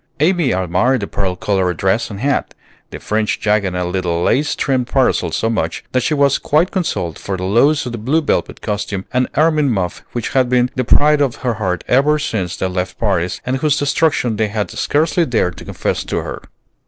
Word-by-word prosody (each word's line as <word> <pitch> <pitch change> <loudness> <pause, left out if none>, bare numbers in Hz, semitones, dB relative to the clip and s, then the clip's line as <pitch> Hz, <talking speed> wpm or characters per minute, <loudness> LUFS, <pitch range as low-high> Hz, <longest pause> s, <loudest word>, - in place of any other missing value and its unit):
Amy 165 -3 +2
admired 95 +8 +1
the 100 - -3
pearl 95 -2 -2
colored 90 -2 0
dress 95 +5 +1
and 100 -2 -7
hat, 140 0 -1 0.3
the - - -7
fringed 105 0 -1
jacket 105 -3 +1
and 90 0 -2
little 90 -2 -1
lace 145 +9 +1
trimmed 130 -3 0
parasol 135 0 +1
so - - 0
much, 115 -1 -2
that 130 - +1
she 150 +5 0
was 140 -1 +3
quite 160 +5 +2
consoled 160 - -2
for 95 -1 -4
the 90 - -5
loss 125 +11 +3
of 125 - -4
the 120 - -5
blue 135 +9 +1
velvet 155 - -1
costume 105 -2 -3
and 125 0 +2
ermine 155 -2 +3
muff 95 -6 -2
which 120 -2 -3
had 130 -2 +2
been 125 0 +2
the 130 - -1
pride 150 +4 +4
of 135 -4 +1
her 120 - +2
heart 95 -5 -2
ever 140 +4 +3
since 100 - -3
they - - -2
left 90 0 -4
Paris, 90 -5 0
and 130 +1 0
whose 150 +1 +1
destruction 145 -5 +1
they 110 0 +1
had 105 0 -3
scarcely 160 +4 +1
dared 110 - 0
to - - -11
confess - - -2
to - - -3
her. - - -6
120 Hz, 205 wpm, -17 LUFS, 95-140 Hz, 0.3 s, pride